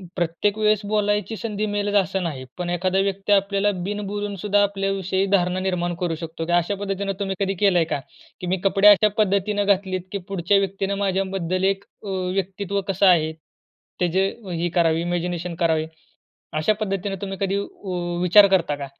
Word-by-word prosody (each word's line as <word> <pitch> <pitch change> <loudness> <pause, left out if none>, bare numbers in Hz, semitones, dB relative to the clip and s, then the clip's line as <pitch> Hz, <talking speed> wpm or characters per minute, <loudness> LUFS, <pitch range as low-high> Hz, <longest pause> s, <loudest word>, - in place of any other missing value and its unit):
प्रत्येक 175 +4 0
वेळेस 215 -1 +2
बोलायची 210 0 0
संधी 215 -2 -3
मिळेलच 205 0 -1
असं 190 0 -3
नाही. 145 -6 -4
पण 180 -1 -3
एखादा 185 +2 0
व्यक्ती 195 +1 -1
आपल्याला 200 +1 +2
बिनबोलून 205 0 -3
सुद्धा 205 +2 +2
आपल्याविषयी 195 -1 0
धारणा 180 -1 +2
निर्माण 180 -2 -1
करू 170 -2 0
शकतो 165 0 -6
की 175 - -3
अशा 175 +3 +2
पद्धतीनं 195 0 -3
तुम्ही 195 -1 -2
कधी 195 -1 0
केलंय 190 -5 +4
का? 155 - -2 0.4
की 180 - -4
मी 185 +2 +1
कपडे 195 +1 +4
अशा 210 +1 +7
पद्धतीनं 205 0 +1
घातलेत 190 -2 +1
की 200 - -2
पुढच्या 195 +1 +2
व्यक्तीनं 195 0 -2
माझ्याबद्दल 190 -2 -1
एक 195 0 +1 0.2
अ, 205 - -6
व्यक्तित्व 190 +1 -2
कसं 195 0 +2
आहे 160 -4 +4 0.7
ते 180 - +3
जे 190 +3 +2 0.2
ही 170 0 -1
करावी, 165 -2 +3
इमॅजिनेशन 175 0 -2
करावी? 160 -2 +1 0.7
अशा 155 +7 +2
पद्धतीने 195 -1 -2
तुम्ही 195 -1 -4
कधी 195 0 0
व 180 -3 -4
विचार 200 +3 +7
करता 170 -6 +2
का? 140 -1 -6
195 Hz, 170 wpm, -23 LUFS, 175-200 Hz, 0.7 s, अशा